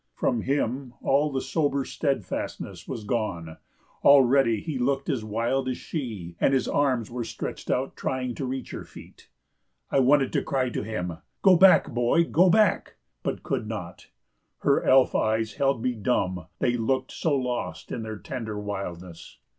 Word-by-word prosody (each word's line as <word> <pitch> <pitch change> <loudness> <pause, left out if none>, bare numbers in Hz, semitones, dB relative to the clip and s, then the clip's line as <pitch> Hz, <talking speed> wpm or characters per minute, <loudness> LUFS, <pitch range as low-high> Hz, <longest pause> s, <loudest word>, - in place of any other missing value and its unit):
From 120 - 0
him 130 -1 -2
all 145 +2 +2
the 135 -1 -1
sober 140 -4 0
steadfastness 135 - -3
was 110 - -5
gone; 100 -8 -3 0.5
already 135 -4 +5
he 155 -6 -4
looked 135 +3 0
as 130 -7 -1
wild 115 +5 -1
as 125 - -2
she, 105 - -5
and 135 - +4
his 130 - 0
arms 130 -6 +1
were 120 0 -3
stretched - - -6
out 130 +2 -1
trying 130 -1 -2
to 135 +2 -4
reach 130 +1 -5
her - - -6
feet. - - -15 0.6
I - - +3
wanted 135 +1 +3
to - - +2
cry 130 -2 -1
to - - -2
him: 90 -6 -4 0.3
"Go 190 -2 +7
back, 190 +2 +6
boy, 120 +7 +3
go 175 +2 +4
back!" 210 +1 +2 0.3
but - - -3
could - - -2
not; - - -7 0.5
her - - +3
elf 130 0 +5
eyes 110 0 0
held 135 -2 0
me 125 - +1
dumb 95 -7 -1
they 120 +6 +1
looked 130 +3 -1
so 155 -4 0
lost 125 -10 -3
in 115 - -3
their 110 -1 -5
tender 110 -3 -5
wildness. 90 -4 -7
125 Hz, 165 wpm, -26 LUFS, 110-135 Hz, 0.6 s, Go